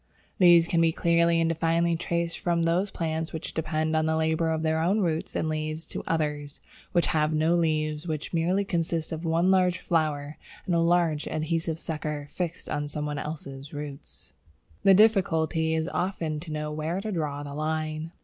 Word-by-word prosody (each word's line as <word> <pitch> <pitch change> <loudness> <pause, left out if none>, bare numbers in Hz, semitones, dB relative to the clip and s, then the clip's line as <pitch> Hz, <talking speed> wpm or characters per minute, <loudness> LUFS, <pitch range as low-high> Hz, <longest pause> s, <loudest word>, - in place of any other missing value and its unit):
These 175 -2 +7
can 170 -1 +2
be 165 -1 +4
clearly 170 0 +3
and 165 - +2
definitely 165 +1 +1
traced 170 0 -2
from 170 -1 +1
those 175 +4 +1
plants 160 -1 -3
which 160 - -6
depend 155 0 -1
on 155 0 +2
the 160 - +1
labour 160 +1 +1
of 160 0 -1
their 160 0 +1
own 195 +6 +2
roots 165 -3 -1
and 160 - 0
leaves 155 +1 -3
to - - -6
others 150 -3 -2 0.3
which 175 - +3
have 155 0 +2
no 160 +2 +2
leaves, 155 -2 0
and - - -6
which 155 -1 -3 0.4
consist 165 -2 -1
merely 160 -1 -4
of - - -7
one 170 +3 +3
large 185 -1 +3
flower 155 -4 -1 0.3
and 180 - -1
a 170 - +3
large 165 -3 +2
adhesive 160 +1 -1
sucker 150 -3 -4
fixed 170 -1 -4
on 145 0 -2
some 150 0 -4
one 150 -1 -3
else's 140 -2 -7
root. 145 - -8 0.5
The 195 - +6
difficulty 165 -6 +3
is 160 0 0
very 180 - -6
often 165 -5 -2
to 160 0 -8
know 150 0 -3
where 155 +4 -2
to 215 +2 -4
draw 150 -5 -2
the 140 -1 -7
line. 155 +1 -2
160 Hz, 190 wpm, -27 LUFS, 155-170 Hz, 0.5 s, These